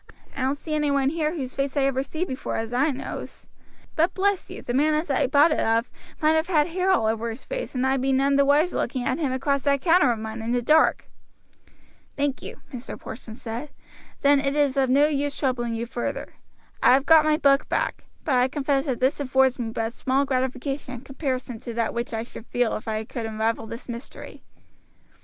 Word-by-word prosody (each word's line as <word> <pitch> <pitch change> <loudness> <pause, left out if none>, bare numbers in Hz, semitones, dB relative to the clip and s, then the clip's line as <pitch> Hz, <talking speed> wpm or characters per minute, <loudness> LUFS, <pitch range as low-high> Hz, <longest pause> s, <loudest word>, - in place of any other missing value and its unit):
"I 275 - -4
don't 265 +2 0
see 310 +1 -6
any 300 -1 +1
one 275 -1 +2
here 315 +1 -1
whose 260 -5 -4
face 275 +1 -2
I 280 - +3
ever 270 -1 +1
see 315 +5 -3
before 260 -6 -4
as 225 0 -3
far 245 - 0
as - - +3
I - - +1
knows; 270 -2 -6 0.5
but 335 +3 +2
bless 395 0 0
you, - - -8
the 240 - -3
man 300 +4 +3
as 305 -1 -1
I 265 - +2
bought 290 +5 +5
it - - +1
of 225 +1 +1 0.3
might 310 - +5
have 320 +1 +1
had 315 -3 +2
hair 365 +2 0
all 375 -12 +3
over 225 +1 0
his 230 +4 -8
face, - - -5
and 255 +1 +1
I 265 +1 +2
be 265 +1 0
none 275 +1 +3
the 280 - +5
wiser 295 +5 +3
looking 250 0 -2
at 260 +4 0
him 290 -5 0
across 280 +2 0
that 280 0 +1
counter 330 -7 +4
of 235 - -1
mine 220 +1 -6
in 230 +2 -2
the 245 - +1
dark." 310 +5 +4 1.1
"Thank 285 -1 -1
you," - - -9
Mr. 250 -1 -7
Porson 220 -1 -9
said; 235 +4 -6 0.5
"then 285 -2 +5
it 275 0 -1
is 290 -2 +2
of 270 -2 +2
no 280 +3 +5
use 290 -1 -1
troubling 240 -4 -1
you 230 +1 -3
further. 240 0 -4 0.5
I - - +6
have 270 +1 0
got 320 -1 +7
my 305 0 +3
book 280 -3 +3
back; - - -1 0.2
but 295 - 0
I 250 0 +4
confess 275 0 -1
that 255 -3 -2
this 260 +3 +2
affords 265 -2 +2
me 230 -2 -2
but 225 0 -3
small 265 +2 0
gratification 260 0 -2
in 235 - -9
comparison 260 -3 -4
to 235 0 -7
that 230 -1 0
which 235 +1 -3
I 225 -1 -2
should 235 -1 -11
feel 245 -2 0
if 215 - -7
I 215 0 -2
could 225 +1 -5
unravel 220 +1 -1
this 230 +2 -8
mystery." 240 +1 -9
270 Hz, 230 wpm, -25 LUFS, 245-290 Hz, 1.1 s, got